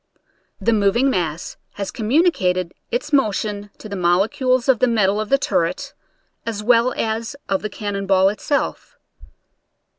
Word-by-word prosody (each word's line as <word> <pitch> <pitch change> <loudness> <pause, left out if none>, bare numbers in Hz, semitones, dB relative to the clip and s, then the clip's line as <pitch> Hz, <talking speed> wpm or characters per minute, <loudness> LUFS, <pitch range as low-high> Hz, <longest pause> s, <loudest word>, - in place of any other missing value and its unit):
The 230 - +2
moving 220 +6 +3
mass 170 -6 -3 0.2
has 200 -1 -4
communi 280 +10 +2
cated 180 - -1 0.2
its 250 +5 -3
motion 210 -5 0
to - - -10
the 200 - -5
molecules 230 - +1
of 260 -4 +4
the 255 - +4
metal 210 -3 +2
of 215 - -5
the 275 - +4
turret, 175 -9 -1 0.5
as 220 -2 -4
well 240 +2 +4
as 225 +3 -2
of 195 -1 0
the 215 - -3
cannon 200 -1 -4
ball 190 0 +4
itself. 275 +7 -2
215 Hz, 150 wpm, -21 LUFS, 195-245 Hz, 0.5 s, of